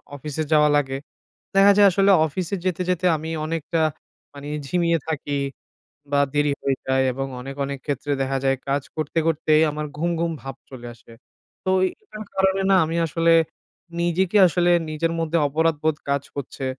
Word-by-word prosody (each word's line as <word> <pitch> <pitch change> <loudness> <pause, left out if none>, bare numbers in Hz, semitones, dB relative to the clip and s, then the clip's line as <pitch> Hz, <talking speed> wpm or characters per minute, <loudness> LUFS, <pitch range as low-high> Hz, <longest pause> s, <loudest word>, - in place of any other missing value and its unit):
অফিসে 150 +2 -4
যাওয়া 150 0 +5
লাগে, 135 -2 -1 0.6
দেখা 200 +1 +7
যায় 200 -1 +8
আসলে 195 +1 +3 0.2
অফিসে 175 +5 -4
যেতে, 185 -1 -1
যেতে 180 0 0
আমি 160 +1 -6 0.2
অনেকটা, 165 0 -1 0.5
মানে 140 0 -9 0.2
ঝিমিয়ে 170 0 +1
থাকি, 145 -2 -2 0.7
বা 140 - +3
দেরি 145 0 +2
হয়ে 135 -1 0
যায় 130 0 +2
এবং 135 +1 -3
অনেক, 135 +2 -7
অনেক 140 -1 -5
ক্ষেত্রে 145 0 -3
দেখা 135 0 0
যায় 135 0 +2
কাজ 140 +1 +1
করতে, 155 +1 -4
করতেই 155 -1 +3
আমার 150 0 -4
ঘুম 170 +3 0
ঘুম 170 0 0
ভাব 135 -1 -7
চলে 120 -2 -9
আসে। 115 0 -19 0.5
তো 185 - -2 0.2
এই - - +1
এইটার 215 - -10
কারণে 190 0 +2
না - - +6
আমি 165 +2 -3
আসলে, 165 +1 +1 0.7
নিজেকে 180 +4 +1
আসলে 175 +1 +2 0.2
নিজের 165 +2 -1
মধ্যে 165 +1 0
অপরাধবোধ 155 0 +1
কাজ 140 0 0
করছে, 135 -1 -5
155 Hz, 170 wpm, -23 LUFS, 140-170 Hz, 0.7 s, যায়